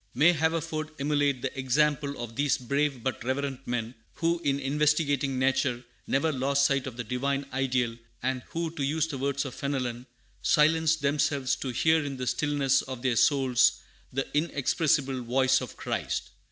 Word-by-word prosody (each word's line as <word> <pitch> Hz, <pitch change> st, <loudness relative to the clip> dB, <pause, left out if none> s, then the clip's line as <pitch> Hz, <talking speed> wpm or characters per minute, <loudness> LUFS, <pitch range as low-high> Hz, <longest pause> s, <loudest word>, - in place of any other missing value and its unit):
May 155 Hz, +7 st, +5 dB
Haverford 160 Hz, -1 st, -1 dB
emulate 145 Hz, -2 st, +1 dB
the 135 Hz, -, -3 dB
example 140 Hz, +2 st, +1 dB
of 120 Hz, -1 st, -6 dB
these 145 Hz, +1 st, +2 dB
brave 140 Hz, 0 st, -1 dB
but 130 Hz, -4 st, -2 dB
reverent 135 Hz, +1 st, -3 dB
men, 120 Hz, -1 st, -2 dB, 0.2 s
who, 170 Hz, +1 st, 0 dB
in 140 Hz, 0 st, +1 dB
investigating 145 Hz, -1 st, +1 dB
nature, 130 Hz, -1 st, +1 dB, 0.2 s
never 140 Hz, +4 st, +1 dB
lost 140 Hz, +1 st, +2 dB
sight 140 Hz, -1 st, +1 dB
of 125 Hz, -2 st, -7 dB
the 125 Hz, -, -3 dB
Divine 135 Hz, +4 st, -1 dB
Ideal, 125 Hz, -3 st, 0 dB, 0.2 s
and 130 Hz, 0 st, -1 dB
who, 165 Hz, -1 st, -3 dB
to 155 Hz, -4 st, -4 dB
use 150 Hz, +3 st, +1 dB
the 145 Hz, -5 st, -5 dB
words 140 Hz, +1 st, -1 dB
of 130 Hz, -, -5 dB
Fenelon, 125 Hz, -3 st, -3 dB, 0.3 s
"Silenced 160 Hz, 0 st, +3 dB
themselves 140 Hz, -2 st, +1 dB
to 135 Hz, -, -4 dB
hear 160 Hz, +5 st, +2 dB
in 140 Hz, -2 st, -5 dB
the 130 Hz, -, -3 dB
stillness 140 Hz, -1 st, +1 dB
of 130 Hz, -2 st, -7 dB
their 125 Hz, -3 st, +2 dB
souls 130 Hz, -1 st, +4 dB, 0.4 s
the 135 Hz, +1 st, -1 dB
inexpressible 145 Hz, -3 st, +1 dB
voice 130 Hz, +2 st, +2 dB
of 130 Hz, -, -8 dB
Christ." -, -, -3 dB
140 Hz, 165 wpm, -28 LUFS, 130-150 Hz, 0.4 s, May